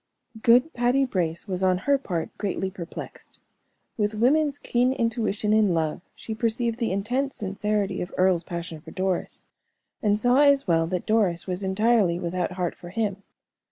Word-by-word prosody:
Good 245 +8 +4
Patty 245 +3 +2
Brace 175 -7 -2
was, 185 -1 -3
on 185 -1 +3
her 280 +8 +1
part, 175 -10 -4
greatly 190 -2 -2
perplexed. 175 -3 -9 0.6
With 210 -1 0
woman's 285 +6 +2
keen 250 0 +1
intuition 220 -3 0
in 210 -5 +3
love, 160 -1 -1
she 220 - -6
perceived 230 +1 -1
the 230 -5 0
intense 245 +8 -1
sincerity 200 -1 -1
of 180 - -5
Earle's 185 -2 +3
passion 170 -3 -6
for - - -12
Doris, 185 -1 -2 0.6
and 205 -1 +2
saw 245 +4 +3
as 280 -1 +5
well 165 -2 +2
that 180 0 -3
Doris 205 -6 +1
was 185 +1 -4
entirely 195 -2 +2
without 180 0 -2
heart 180 -2 -2
for 175 - -11
him. 205 0 -1
205 Hz, 160 wpm, -25 LUFS, 180-235 Hz, 0.6 s, as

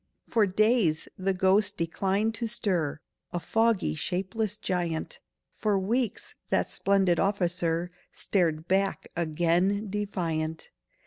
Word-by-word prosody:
For 220 -3 +3
days 205 -5 +2
that 190 0 0
ghost 195 +2 +3
declined 195 +6 0
to 230 +1 -3
stir, 180 -10 -1 0.3
A 175 - -2
foggy 225 - +1
shapeless 195 - -2
giant— 175 -5 -2 0.3
For 210 -2 0
weeks 225 +4 -1 0.2
that - - +1
splendid 195 -4 +2
officer 175 -3 0 0.2
Stared 165 -4 0
back 195 +1 0
again 175 +5 +1
defiant. 165 -6 -3
190 Hz, 110 wpm, -28 LUFS, 170-205 Hz, 0.3 s, For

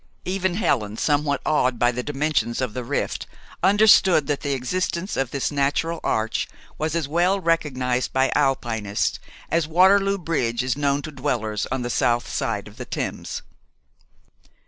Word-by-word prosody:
Even 185 -1 -1
Helen, 110 - 0
somewhat 145 0 +1
awed 130 -5 +2
by 120 0 +3
the 125 +1 -3
dimensions 145 -3 -1
of 125 -5 -2
the 125 - -4
rift, - - -2 0.3
understood 195 -4 +5
that 145 0 -1
the 145 -1 -1
existence 170 +7 -2
of 135 -2 -1
this 140 +2 -2
natural 145 +4 0
arch 110 +1 0 0.3
was 155 +1 -1
as 165 -4 -1
well 175 +6 +2
recognized 130 -8 0
by 130 0 +2
Alpinists 120 -7 0 0.3
as 165 -2 +1
Waterloo 195 +4 +4
Bridge 125 -10 -1
is 130 -1 0
known 140 0 0
to 155 - -6
dwellers 120 -7 -2
on 130 -1 -1
the 120 - -3
south 120 0 +1
side - - -2
of - - -14
the - - -6
Thames. - - -4
145 Hz, 155 wpm, -23 LUFS, 125-170 Hz, 0.3 s, understood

